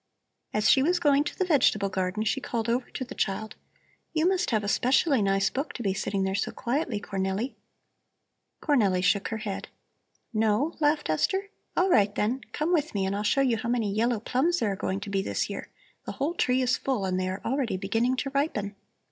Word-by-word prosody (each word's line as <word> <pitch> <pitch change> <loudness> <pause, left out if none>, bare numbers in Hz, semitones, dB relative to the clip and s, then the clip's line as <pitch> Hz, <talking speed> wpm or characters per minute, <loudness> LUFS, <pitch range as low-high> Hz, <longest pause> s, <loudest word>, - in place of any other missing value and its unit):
As 210 0 +1
she 265 - +6
was 350 +6 +3
going 290 -3 +4
to - - -5
the 375 - +1
vegetable 245 - +3
garden 190 +2 -1
she 270 +5 0
called 230 -2 -2
over 240 +2 0
to 260 - -5
the 250 - -8
child: 215 +1 -2 0.6
"You 320 +1 +2
must 365 -1 +1
have 215 -3 +1
a - - -3
specially 260 +4 +3
nice 195 0 +2
book 275 +4 -3
to 240 - -6
be 195 -2 +1
sitting 195 0 -1
there 190 0 0
so 200 - -1
quietly, 250 -3 -2
Cornelli." 195 +5 -2 1.1
Cornelli 205 - +2
shook 200 +1 +2
her 225 - -3
head. 210 -3 -5 0.7
"No?" 220 +8 +1
laughed 295 0 +2
Esther. 385 - 0 0.3
"All 370 +1 +3
right, 205 -4 +4
then, 240 +6 0
come 320 +4 -1
with 305 -8 0
me 195 -1 +1
and 195 +1 -1
I'll 205 - -1
show 215 +6 +2
you 250 -4 +2
how 235 +1 -4
many 225 -5 0
yellow 230 +2 +1
plums 270 +10 +1
there 220 -10 0
are - - -2
going 190 +1 -3
to 200 -1 -6
be 195 -1 +1
this - - -2
year; - - -6 0.4
the - - -3
whole 290 +5 -1
tree 255 -6 +1
is 250 0 +2
full 255 -8 -1
and 185 -1 0
they 185 0 -1
are 190 +2 -4
already 250 -5 0
beginning 225 +6 0
to 275 +1 -2
ripen." 240 -8 -1
230 Hz, 215 wpm, -27 LUFS, 200-275 Hz, 1.1 s, she